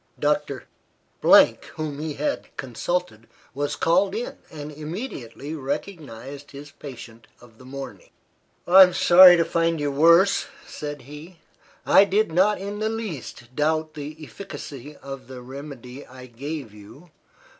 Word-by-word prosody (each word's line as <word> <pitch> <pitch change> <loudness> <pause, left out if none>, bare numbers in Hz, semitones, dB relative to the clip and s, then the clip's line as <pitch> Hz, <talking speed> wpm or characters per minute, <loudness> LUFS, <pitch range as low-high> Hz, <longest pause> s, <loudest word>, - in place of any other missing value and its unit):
Doctor, - - 0 0.6
whom 150 -2 +3
he 155 -1 -4
had 290 -1 -2
consulted, 130 -2 -3 0.3
was 145 +1 -2
called 190 +6 +2
in, 235 +2 -5
and 150 -1 -8
immediately 150 - -7
recognised 140 - -6
his 145 +1 -11
patient 120 -5 -11
of 115 -2 -19
the 130 - -14
morning. 135 +1 -9 0.6
"I'm 185 0 +8
sorry 180 0 +8
to 165 - +2
find 165 -1 0
you 145 -1 -1
worse," 170 +7 +4 0.2
said 145 -2 -7
he. 150 +6 -12 0.5
"I 200 - +6
did 205 -1 +1
not 195 +5 +3
in 200 +2 -5
the 215 0 0
least 160 - -7
doubt 155 +1 0
the 150 +1 -7
efficacy 150 -6 -9
of 135 -2 -8
the 130 -1 -10
remedy 135 0 -9
I 130 0 -12
gave 130 0 -7
you. 110 - -15
150 Hz, 135 wpm, -24 LUFS, 130-175 Hz, 0.6 s, I'm